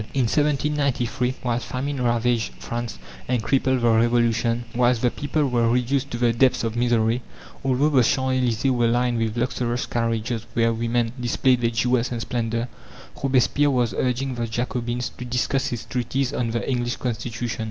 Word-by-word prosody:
In 135 - +3
1793, 140 -2 0
while 120 -1 0
famine 135 +2 -3
ravaged 120 -1 +1
France 120 -2 -5 0.3
and 125 -3 0
crippled 130 0 +1
the 120 - +3
Revolution; 115 0 +2
whilst 120 -1 +2
the 120 - +3
people 145 +1 -1
were 120 -2 +2
reduced 125 +3 +1
to 120 - -4
the 120 -1 +2
depths 125 +1 +3
of 115 0 -2
misery, 120 0 +2 0.4
although 135 +2 +2
the 135 -4 +4
Champs 130 +2 +1
Elysées 125 +2 +1
were 120 -2 +2
lined 120 0 +1
with 115 0 -1
luxurious 120 0 -1
carriages 115 0 -2
where 115 0 +3
women 115 0 0
displayed 125 +1 +2
their 115 - +2
jewels 120 +2 +1
and 120 - -2
splendour, 115 0 -2 0.6
Robespierre 135 +2 +3
was 120 -6 +1
urging 130 +3 -1
the 120 -1 -3
Jacobins 120 +1 -2
to - - -7
discuss 125 +3 0
his 120 -4 -4
treatise 130 +2 -1
on 120 -4 -1
the 115 +1 -2
English 120 -2 -1
Constitution. 120 -1 -4
120 Hz, 165 wpm, -23 LUFS, 115-130 Hz, 0.6 s, the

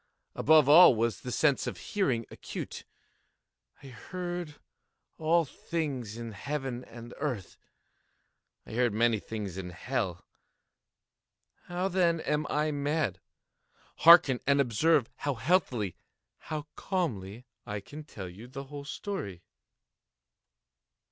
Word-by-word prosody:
Above 155 -2 +5
all 155 -2 +9
was 115 +1 0
the 125 - -5
sense 145 0 +2
of - - -4
hearing 130 - -1
acute. - - -7 1.0
I 135 - -10
heard 175 +4 -6 0.6
all 165 +1 +3
things 135 -8 -4
in 115 -1 -5
the 110 - -10
heaven 135 -1 -4
and - - -14
in 120 0 -9
the - - -13
earth. 125 - -3 1.1
I - - -11
heard 120 -1 +1
many 115 -1 +3
things 100 -4 -6
in 90 -1 -5
hell. 95 -2 -3 1.4
How, 180 +2 -2
then, 175 -3 +2
am 150 0 -1
I 150 +1 +1
mad? 145 - -1 0.8
Hearken! 160 -7 +8
and 140 0 +4
observe 140 +2 +3
how 145 -2 -2
healthily—how 140 - -2
calmly 120 - -3 0.2
I 105 -1 -3
can 150 +9 -10
tell 100 -10 -8
you 100 +7 -11
the 135 +2 -7
whole 140 +1 -9
story. 140 - -5
135 Hz, 120 wpm, -30 LUFS, 115-155 Hz, 1.4 s, all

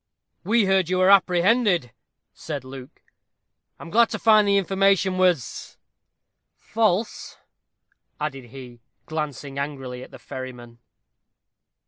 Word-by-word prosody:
"We 230 -1 +2
heard 190 -3 +2
you 185 - 0
were 185 +1 +4
apprehended," 185 - +3 0.4
said 145 -4 -6
Luke. 130 0 -12 0.7
"I - - -12
am 165 - -10
glad 230 +2 +4
to - - -4
find 215 -2 +4
the 200 0 +3
information 195 -1 +1
was 180 -8 0 0.8
false," 220 -1 -1 0.8
added 140 -4 -4
he, 120 -1 -12 0.2
glancing 145 -3 -5
angrily 135 -3 -5
at - - -11
the - - -12
ferryman. 125 -2 -9
170 Hz, 115 wpm, -23 LUFS, 135-195 Hz, 0.8 s, were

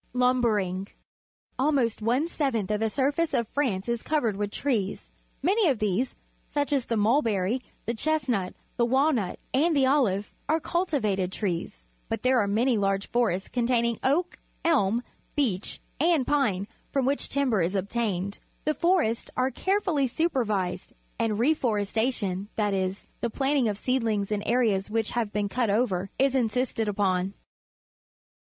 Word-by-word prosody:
Lumbering. 225 -7 +1 0.4
— - - -45
Almost 260 -6 +2
one 245 +8 +1
seventh 250 - -1
of 210 - +1
the 220 0 +1
surface 285 +5 +1
of 235 -3 +1
France 230 -9 -1
is 235 -1 -1
covered 245 -9 0
with 205 0 -2
trees. 210 -5 -2 0.3
Many 385 +2 +3
of 265 - +1
these, 215 +4 0 0.3
such 290 0 -1
as 270 -4 +1
the 230 - -1
mulbe 230 +8 +3
cry, 205 +2 +1 0.3
the 235 - -1
chestmit, 250 -8 0 0.2
the 235 - +3
walnut, 260 - +1 0.2
and 315 +5 +3
the 270 - +4
olive, 235 -8 +2 0.2
are 320 +1 +3
cultivated 250 - 0
trees, 170 - -3 0.2
but - - -3
there 255 0 +4
are 205 - +2
many 225 +3 +2
large 195 0 0
forests 220 -6 +1
containing 235 -2 +1
oak, 335 +7 +1 0.3
elm, 240 -8 +3 0.3
beech, 215 -10 0 0.2
and 320 -3 +3
p 290 -2 +3
ing, 195 +1 -4 0.2
from 275 -2 +1
which 280 +2 +1
timber 260 -8 +1
is 175 +4 0
obtained. 200 -1 -2 0.3
The 305 - +2
forests 325 -10 +1
are 255 +1 +2
carefully 375 -8 +1
supervised, 230 - -1 0.3
and 215 -2 +1
reforestation, 220 -6 0
that 210 -2 +1
is, 190 0 -2
the 235 - -1
planting 270 +1 +1
of 205 -2 -1
seedlings 220 -5 0
in 210 -1 0
areas 220 -5 +2
which 220 0 0
have 230 -4 -1
been 210 -1 0
cut 235 +2 0
over, 200 -3 +1
is 270 0 +3
insisted 245 -2 0
upon. 195 -2 0
235 Hz, 155 wpm, -27 LUFS, 205-270 Hz, 0.4 s, the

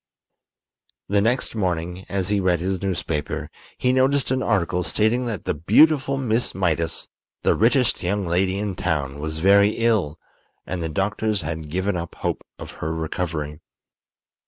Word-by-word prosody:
The 100 0 +3
next 120 +5 0
morning, 90 -3 -2
as 95 -1 -1
he 105 -1 +2
read 90 -3 +2
his 95 +1 -2
newspaper, 85 -6 -3 0.3
he 125 0 +2
noticed 135 +1 +2
an 130 0 +1
article 90 -6 +1
stating 110 +7 +1
that 110 -5 -4
the - - 0
beautiful 135 - +4
Miss 120 -3 0
Mydas, 85 -3 0 0.4
the - - +4
richest 125 -1 +3
young 100 +2 -1
lady 95 +3 +1
in 100 -2 -2
town, 75 -6 -2
was 80 +1 -4
very 100 +4 +5
ill, 110 -10 +1 0.5
and 90 -1 -4
the 80 - -2
doctors 105 +5 0
had 80 -2 -5
given 95 +4 -1
up 85 -1 -5
hope - - -3
of - - -8
her 80 - -1
recovery. 80 -2 -3
95 Hz, 155 wpm, -23 LUFS, 85-110 Hz, 0.5 s, very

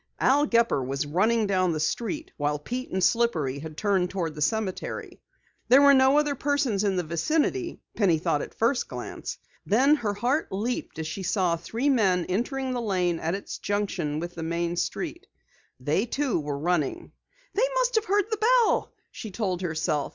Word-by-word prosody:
Al 290 +3 +3
Gepper 230 - +2
was 135 +3 -2
running 215 +9 +2
down 185 -3 +1
the 155 - -2
street, 235 - -2
while 145 0 -1
Pete 250 - -5
and 190 -1 -1
Slippery 165 - +1
had 155 +1 -8
turned 195 -4 +1
toward 170 -5 -3
the 150 - -8
cemetery. 215 0 -2 0.5
There 270 +3 +7
were 280 0 +8
no 265 +1 +5
other 295 -1 +2
persons 275 -7 0
in 200 -2 +1
the 180 - 0
vicinity, 315 - -1
Penny 185 -7 +3
thought 150 -1 0
at - - -8
first 240 +3 +1
glance. - - -6 0.3
Then 260 +8 +4
her 210 -6 -2
heart 255 +9 0
leaped 215 0 -3
as 160 - -3
she 155 +5 -5
saw 180 -2 +1
three 225 - -3
men 195 -10 +3
entering 260 +7 -1
the 245 -1 -2
Lane 180 -6 0
at 165 +3 -1
its 200 - -7
junction 190 -7 -2
with 175 +1 -5
the 170 - -7
main 170 +1 -1
street. 175 - -3 0.5
They, 150 - 0
too, 270 -4 0
were 145 -2 -3
running. 155 -2 -1 0.4
"They 480 +5 +2
must - - +2
have 440 -2 +2
heard 405 -1 +2
the 435 - 0
bell!" 475 0 +3 0.2
she 220 - -7
told 185 -3 -2
herself. 155 -4 -1
200 Hz, 180 wpm, -26 LUFS, 170-260 Hz, 0.5 s, were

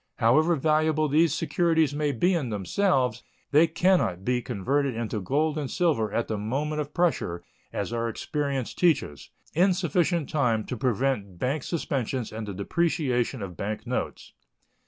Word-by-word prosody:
However 155 +9 +4
valuable 155 +1 +2
these 155 +2 +3
securities 160 -1 +1
may 150 0 0
be 175 +9 +2
in 150 -8 -1
themselves, 125 - +1 0.3
they 155 +3 +6
can 180 +3 +3
not 90 +1 -2
be 125 0 +1
converted 135 +6 -1
into 110 -2 -3
gold 150 - 0
and 140 -3 -3
silver 140 - +1
at 115 +2 -1
the 110 -2 -2
moment 145 +8 -2
of 145 0 -6
pressure, 150 - 0 0.3
as - - -3
our 115 0 -1
experience 140 0 -3
teaches, 145 - 0 0.2
in 180 +3 +3
sufficient 170 -3 +1
time 120 -7 +1
to 125 - -4
prevent 120 -5 -1
bank 135 - -1
suspensions 130 -6 -2
and 110 0 -6
the 100 - -4
depreciation 130 - 0
of 90 -3 -7
bank 105 +5 -4
notes. - - -4
140 Hz, 155 wpm, -26 LUFS, 115-160 Hz, 0.3 s, they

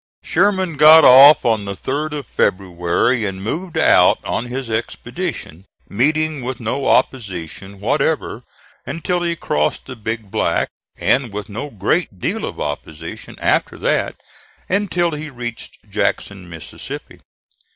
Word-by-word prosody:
Sherman 185 -3 +1
got 155 +1 +8
off 135 +3 +8
on 110 -3 +1
the 100 0 -4
3d 150 +8 -3
of 145 -3 -5
February 95 +5 0
and 95 -2 -4
moved 170 - -4
out - - +5
on 115 - -2
his 125 +1 -5
expedition, 115 - -5 0.2
meeting 155 +5 0
with 130 0 -4
no 130 +4 -2
opposition 100 - -1
whatever 140 +2 -1 0.4
until 175 +2 -2
he 170 -1 -1
crossed 75 - -1
the 130 - -8
Big 110 -2 -5
Black, - - 0 0.3
and 130 -4 +1
with 105 +1 -6
no 115 +8 -5
great 105 - -1
deal - - -2
of - - -7
opposition 75 +2 -6
after - - 0
that - - 0 0.5
until 185 -3 0
he 150 0 -6
reached 120 -3 -8
Jackson, 95 -3 -2
Mississippi. 80 -2 -9
125 Hz, 130 wpm, -19 LUFS, 100-155 Hz, 0.5 s, got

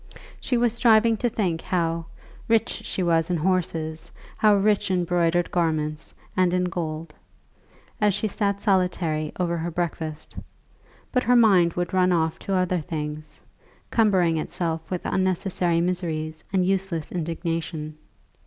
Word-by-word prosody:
She 245 - 0
was 235 -1 +2
striving 230 -1 +4
to 240 - 0
think 180 -7 -1
how 165 -2 -1 0.4
"rich 225 0 +1
she 185 - -2
was 165 -1 +2
in 175 - +1
horses, 160 -2 -1 0.2
how 210 -1 +4
rich 205 0 +2
in 180 -2 +1
broidered 175 0 +1
garments 155 -3 -1 0.2
and 180 -1 +3
in 180 - +1
gold," 165 -2 -4 0.9
as 205 -2 +3
she 215 - -1
sat 200 -1 -1
solitary 180 -6 0
over 170 -1 0
her 165 +1 -2
breakfast; 160 -2 -4 0.8
but 250 - +2
her 250 0 +3
mind 190 -8 +5
would 175 0 -3
run 185 -1 +3
off 160 -2 +1
to 195 - -2
other 185 -1 +1
things, 150 -1 -6 0.5
cumbering 185 -7 +3
itself 165 0 -3
with 180 -2 -4
unnecessary 185 -2 0
miseries 160 -3 -2
and 185 -2 +2
useless 190 -4 -1
indignation. 165 -2 -3
175 Hz, 140 wpm, -24 LUFS, 165-190 Hz, 0.9 s, mind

